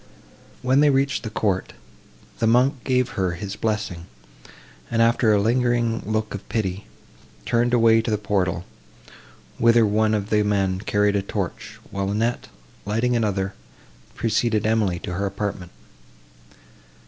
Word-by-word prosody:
When 130 Hz, +2 st, +3 dB
they 150 Hz, 0 st, +5 dB
reached 140 Hz, 0 st, +1 dB
the 110 Hz, -, -5 dB
court, 100 Hz, -4 st, -1 dB, 0.7 s
the 115 Hz, -, +2 dB
monk 125 Hz, +3 st, +3 dB
gave 125 Hz, -1 st, +1 dB
her 95 Hz, -4 st, -1 dB
his 100 Hz, +3 st, -6 dB
blessing, 105 Hz, -6 st, -3 dB, 0.8 s
and, 115 Hz, -, -1 dB
after 115 Hz, 0 st, +4 dB
a 105 Hz, -, +4 dB
lingering 120 Hz, +1 st, +1 dB
look 110 Hz, 0 st, -1 dB
of 100 Hz, -, -8 dB
pity, 100 Hz, -3 st, -2 dB, 0.6 s
turned 120 Hz, +1 st, +1 dB
away 115 Hz, -2 st, +5 dB
to 115 Hz, -, -4 dB
the 105 Hz, -, +1 dB
portal, 90 Hz, -4 st, -1 dB, 0.9 s
whither 115 Hz, 0 st, +5 dB
one 110 Hz, +1 st, +2 dB
of 100 Hz, -1 st, -3 dB
the 105 Hz, -1 st, +3 dB
men 100 Hz, -3 st, 0 dB
carried 105 Hz, 0 st, +1 dB
a 100 Hz, -, +2 dB
torch; 100 Hz, -, -5 dB
while 100 Hz, 0 st, -2 dB
Annette, 115 Hz, +4 st, -1 dB, 0.4 s
lighting 115 Hz, +4 st, 0 dB
another, 100 Hz, -4 st, -1 dB, 0.6 s
preceded 115 Hz, -1 st, 0 dB
Emily 110 Hz, -5 st, +1 dB
to 90 Hz, -, -6 dB
her 100 Hz, +3 st, -1 dB
apartment. 100 Hz, -2 st, -4 dB
110 Hz, 140 wpm, -23 LUFS, 100-115 Hz, 0.9 s, they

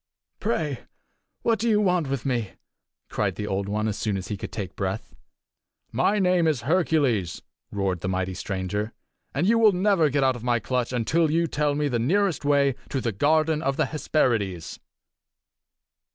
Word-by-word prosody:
"Pray 155 Hz, -, -2 dB, 0.6 s
what 225 Hz, -2 st, +2 dB
do 230 Hz, +2 st, +1 dB
you 210 Hz, -1 st, +4 dB
want 180 Hz, -7 st, +1 dB
with 135 Hz, -2 st, -3 dB
me?" 120 Hz, -7 st, -1 dB, 0.5 s
cried -, -, -1 dB
the 105 Hz, -, -4 dB
Old 100 Hz, 0 st, -2 dB
One 105 Hz, +1 st, 0 dB
as 105 Hz, -, -3 dB
soon 105 Hz, -3 st, -1 dB
as 95 Hz, -1 st, -6 dB
he 105 Hz, -, -2 dB
could 95 Hz, -, -7 dB
take 100 Hz, -4 st, -5 dB
breath. 95 Hz, +2 st, -3 dB, 0.8 s
"My 135 Hz, -, +2 dB
name 180 Hz, -3 st, +3 dB
is 150 Hz, -7 st, +1 dB
Hercules!" 140 Hz, -, +1 dB, 0.3 s
roared 95 Hz, -3 st, -1 dB
the 95 Hz, -, -3 dB
mighty 95 Hz, 0 st, -1 dB
stranger, 100 Hz, +3 st, -3 dB, 0.4 s
"and -, -, +1 dB
you 230 Hz, +3 st, +4 dB
will 215 Hz, -3 st, +6 dB
never 180 Hz, -4 st, +3 dB
get 140 Hz, 0 st, +1 dB
out 130 Hz, -1 st, +3 dB
of 120 Hz, -, -9 dB
my 120 Hz, -1 st, +2 dB
clutch 125 Hz, +2 st, -1 dB
until 150 Hz, +7 st, +1 dB
you 165 Hz, +2 st, +2 dB
tell 150 Hz, -2 st, 0 dB
me 150 Hz, 0 st, 0 dB
the 120 Hz, -4 st, 0 dB
nearest 180 Hz, -, +1 dB
way 140 Hz, -1 st, +3 dB, 0.2 s
to 135 Hz, -, -1 dB
the 120 Hz, -2 st, -1 dB
garden 155 Hz, +7 st, +2 dB
of 135 Hz, -3 st, -1 dB
the 155 Hz, -, +2 dB
Hesperides." 115 Hz, -, -1 dB
135 Hz, 180 wpm, -25 LUFS, 105-160 Hz, 0.8 s, will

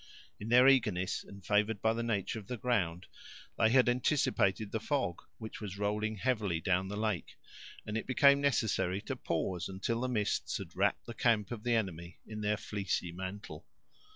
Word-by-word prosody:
In 105 Hz, -, -6 dB
their 125 Hz, +2 st, +7 dB
eagerness, 105 Hz, -9 st, +2 dB
and 100 Hz, -1 st, -13 dB
favored 105 Hz, 0 st, +2 dB
by 110 Hz, +2 st, +2 dB
the 115 Hz, -, -2 dB
nature 110 Hz, -1 st, -1 dB
of 100 Hz, -, -13 dB
the 125 Hz, -, -4 dB
ground, 95 Hz, -8 st, 0 dB, 0.5 s
they 110 Hz, -, +5 dB
had 130 Hz, +1 st, +5 dB
anticipated 120 Hz, -6 st, +1 dB
the 110 Hz, -, -1 dB
fog, 120 Hz, -, -1 dB, 0.2 s
which 110 Hz, -1 st, -8 dB
was 100 Hz, -2 st, -6 dB
rolling 105 Hz, +2 st, -1 dB
heavily 105 Hz, -6 st, 0 dB
down 95 Hz, +1 st, +1 dB
the 105 Hz, +1 st, -5 dB
lake, 105 Hz, -5 st, -2 dB, 0.5 s
and 105 Hz, -, -4 dB
it 115 Hz, -, -3 dB
became 140 Hz, +2 st, +5 dB
necessary 110 Hz, -9 st, +1 dB
to 135 Hz, -, -4 dB
pause, 90 Hz, -4 st, -2 dB
until 110 Hz, +5 st, -2 dB
the 130 Hz, -, 0 dB
mists 105 Hz, -5 st, -1 dB
had -, -, -9 dB
wrapped -, -, +1 dB
the 120 Hz, -, -7 dB
camp 110 Hz, -3 st, +1 dB
of 120 Hz, -3 st, -5 dB
the 120 Hz, +1 st, +1 dB
enemy 85 Hz, -5 st, -3 dB
in 105 Hz, -1 st, -7 dB
their 105 Hz, 0 st, +1 dB
fleecy 95 Hz, -4 st, -2 dB
mantle. 95 Hz, +3 st, -7 dB
105 Hz, 180 wpm, -32 LUFS, 95-120 Hz, 0.5 s, their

